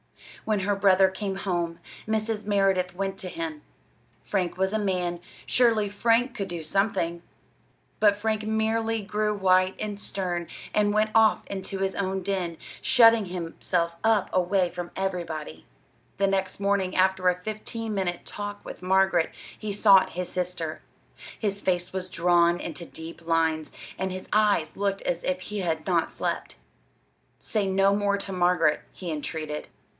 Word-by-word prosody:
When 215 -2 +1
her 205 +2 +1
brother 195 -1 +5
came 190 0 -4
home, 175 -4 -2 0.3
Mrs. 220 -1 -1
Merideth 195 -3 +2
went 195 0 -3
to 185 - -5
him. 160 -3 -5 0.6
Frank 185 -3 -2
was 190 +2 +1
a 220 - +1
man: 180 -4 -1 0.3
surely 230 -4 +3
Frank 230 +4 +2
could 195 - -3
do 170 -3 -5
something! 170 -1 0 0.8
But 205 -1 +5
Frank 215 +1 -1
merely 220 0 0
grew 210 +1 0
white 185 -1 +3
and 210 -1 -4
stern, 180 -4 -3 0.3
and 205 -1 +3
went 215 0 +2
off 220 -1 +4
into 195 0 -5
his 190 0 -1
own 190 -1 -2
den, 180 -4 -2 0.2
shutting 230 -4 +6
himself 170 -1 -2
up 220 -3 +2
away 185 0 +2
from 175 -1 -5
everybody. 165 - -4 0.5
The 200 - +3
next 195 -1 0
morning, 200 -2 +1
after 185 0 +3
a 180 0 -1
fifteen 215 +2 -5
minute 185 -3 -2
talk 205 0 -6
with - - -8
Margaret, 190 -2 +3 0.3
he 215 -1 -4
sought 200 -1 +5
his 180 0 -3
sister. 175 -3 -3 0.6
His 200 -2 -2
face 180 -1 -1
was 185 -1 -4
drawn 175 0 +3
into 170 - -6
deep 165 +1 -10
lines, 160 -1 +1 0.3
and 190 0 -1
his 185 0 -6
eyes 205 -7 +3
looked 200 0 -1
as 170 - -2
if 185 0 -1
he 210 +2 -5
had 170 -4 -1
not - - +1
slept. - - -3 0.8
"Say 210 -3 -1
no 195 +1 +3
more 200 -1 +1
to 195 0 -5
Margaret," 175 -4 +3
he 180 -3 -6
entreated. 155 0 -4
190 Hz, 155 wpm, -26 LUFS, 175-205 Hz, 0.8 s, shutting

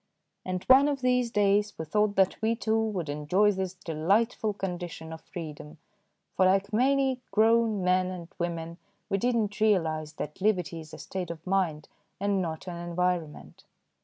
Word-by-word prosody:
And 185 -1 -3
one 270 +2 +6
of 280 -2 -1
these 250 -1 +2
days 205 -1 +2
we 160 - -4
thought 210 +5 +1
that 190 +1 +2
we, 225 +1 +2
too, 220 -1 0
would 210 -7 -2
enjoy 150 +8 +2
this 190 -1 -3
delightful 195 +7 0
condition 175 -4 -5
of 160 - -9
freedom, 155 -2 -8 0.6
for, 185 - +4
like 195 +2 +1
many 265 +2 +2
grown 220 -1 +3
men 180 0 +2
and 180 -2 -6
women, 170 0 -4 0.3
we 195 - +1
did 245 +4 +1
not 210 -2 -1
realise 160 -8 +1
that 150 +5 -7
liberty 180 -5 +1
is 155 -1 -11
a - - -9
state 185 -2 -5
of 165 -1 -8
mind 180 -6 0 0.3
and 200 -1 +1
not 165 0 -5
an 175 -1 -5
environment. 175 -2 -3
185 Hz, 165 wpm, -28 LUFS, 170-215 Hz, 0.6 s, one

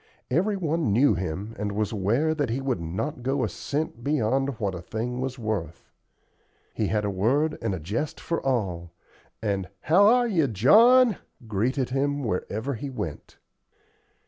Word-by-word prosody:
Every 195 +9 +1
one 165 - 0
knew 120 +3 +4
him 95 +5 -4
and 105 0 -2
was 105 0 -1
aware 115 +10 +1
that 145 -5 -1
he 120 +4 -1
would 135 -7 -1
not 95 - -4
go 135 +1 0
a - - +1
cent 140 -1 -4
beyond 135 -1 0
what 100 -4 -1
a 90 - -6
thing 120 +7 -4
was 130 0 -3
worth. 105 -8 -4 0.8
He - - -1
had 105 -1 0
a 100 - 0
word 135 +11 +1
and 115 -5 -1
a - - -6
jest 105 - -3
for 165 - -3
all, 90 -10 -1 0.5
and 100 -4 -1
"How 190 +6 +5
ARE 245 +2 +5
YOU, 170 -10 +2
JOHN?" 220 - +6 0.3
greeted 125 +5 -1
him 145 +2 0
wherever 110 +5 -2
he 135 +4 -5
went. 85 - -6
125 Hz, 165 wpm, -26 LUFS, 105-145 Hz, 0.8 s, JOHN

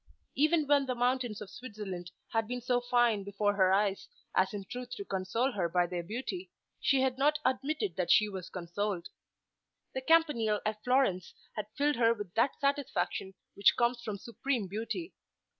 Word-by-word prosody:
Even 305 +2 +3
when 285 -1 +3
the 255 - -1
mountains 245 -3 0
of 205 - -7
Switzerland 200 -7 -7 0.2
had 225 -1 +1
been 250 +1 -3
so 245 0 +1
fine 240 -4 +2
before 200 +1 0
her 190 -2 +4
eyes 195 0 +1 0.3
as - - +3
in 205 -2 -5
truth 250 +4 -6
to 200 - -6
console 195 +8 0
her 185 -7 -1
by 175 +1 +3
their 175 0 -3
beauty, 260 - -5 0.3
she 270 -2 +3
had 260 0 0
not 300 +2 +4
admitted 280 - 0
that 180 -2 -1
she 210 - +6
was 190 -3 -6
consoled. 185 +1 -3 0.8
The 260 - -2
Campanile 260 -9 +3
at 215 0 -2
Florence 250 -9 +1 0.2
had 210 -1 -3
filled 290 -1 +2
her 230 -1 +4
with 205 -4 -7
that 230 +5 +1
satisfaction 280 -8 -1 0.2
which 200 - +4
comes 240 0 +2
from 215 -3 -4
supreme 235 +1 -2
beauty. 230 - -4
230 Hz, 175 wpm, -31 LUFS, 200-260 Hz, 0.8 s, she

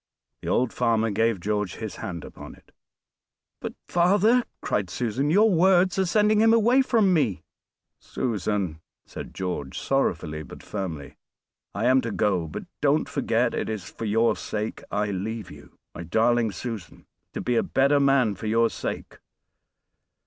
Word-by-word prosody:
The - - -8
old 125 -1 +1
farmer 115 -1 +1
gave 110 0 +1
George 105 0 -2
his 110 -4 -6
hand 85 -4 -6
upon - - -11
it. - - -24 0.9
"But, - - -6
father," 205 +8 +3 0.2
cried 100 -3 -1
Susan, 125 +7 -1
"your 210 +6 +5
words 185 +1 +4
are 190 - +2
sending 210 +3 +3
him 225 +1 +6
away 240 +4 +4
from 220 -7 +3
me." 110 - +1 0.6
"Susan!" 100 -7 -2 0.2
said - - -9
George 90 -8 -4
sorrowfully 80 - -1
but 75 - -11
firmly, 85 -8 -6 0.6
"I 110 - -1
am 130 +1 +5
to 115 -2 -4
go, 95 -6 0
but 75 - -6 0.2
don't - - +2
forget - - 0
it - - -2
is 110 -4 -4
for 115 - -6
your 115 +2 +2
sake 105 +1 -4
I 105 0 -1
leave 105 +3 -4
you, 75 -1 -15 0.2
my - - -7
darling 115 +6 +2
Susan 110 -7 -7 0.3
to - - -4
be 125 - 0
a - - +4
better 140 +2 +2
man 135 -6 +3
for 110 - -6
your 115 +1 +2
sake. - - -6
115 Hz, 155 wpm, -25 LUFS, 100-145 Hz, 0.9 s, him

